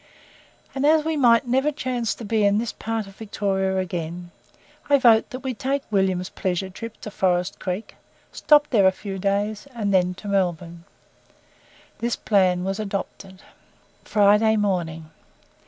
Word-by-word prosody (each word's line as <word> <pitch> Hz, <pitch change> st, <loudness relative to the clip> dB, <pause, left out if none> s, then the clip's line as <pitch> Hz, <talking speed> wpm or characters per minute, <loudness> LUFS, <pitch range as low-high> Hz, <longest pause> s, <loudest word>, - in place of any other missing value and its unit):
And 270 Hz, -, -3 dB
as 310 Hz, +1 st, +4 dB
we 320 Hz, 0 st, 0 dB
may 235 Hz, -5 st, +5 dB
never 265 Hz, +5 st, +1 dB
chance 255 Hz, -5 st, -2 dB
to 230 Hz, -, -9 dB
be 215 Hz, 0 st, +1 dB
in 200 Hz, 0 st, +3 dB
this 230 Hz, 0 st, -2 dB
part 225 Hz, -1 st, -3 dB
of 195 Hz, 0 st, -15 dB
Victoria 195 Hz, -3 st, -1 dB
again, 175 Hz, -1 st, -4 dB, 0.6 s
I 285 Hz, -, +6 dB
vote 235 Hz, -4 st, +4 dB
that 255 Hz, -, -7 dB
we 265 Hz, -2 st, -3 dB
take 275 Hz, +3 st, -2 dB
William's 190 Hz, -2 st, 0 dB
'pleasure 190 Hz, 0 st, -2 dB
trip' 230 Hz, +4 st, -9 dB
to 210 Hz, -, -7 dB
Forest 180 Hz, 0 st, 0 dB
Creek, 185 Hz, +3 st, -4 dB, 0.4 s
stop 295 Hz, -1 st, +4 dB
there 205 Hz, -6 st, +5 dB
a -, -, +5 dB
few 195 Hz, 0 st, -7 dB
days, 205 Hz, +4 st, -1 dB
and 205 Hz, -4 st, -1 dB
then 180 Hz, -1 st, +2 dB
to 205 Hz, -, -10 dB
Melbourne." 175 Hz, -3 st, -2 dB, 1.1 s
This 235 Hz, 0 st, -1 dB
plan 185 Hz, -4 st, +2 dB
was 195 Hz, +2 st, -3 dB
adopted. 195 Hz, -2 st, -6 dB, 0.6 s
FRIDAY 210 Hz, +1 st, +3 dB
MORNING. 165 Hz, -6 st, -2 dB
200 Hz, 155 wpm, -23 LUFS, 185-230 Hz, 1.1 s, I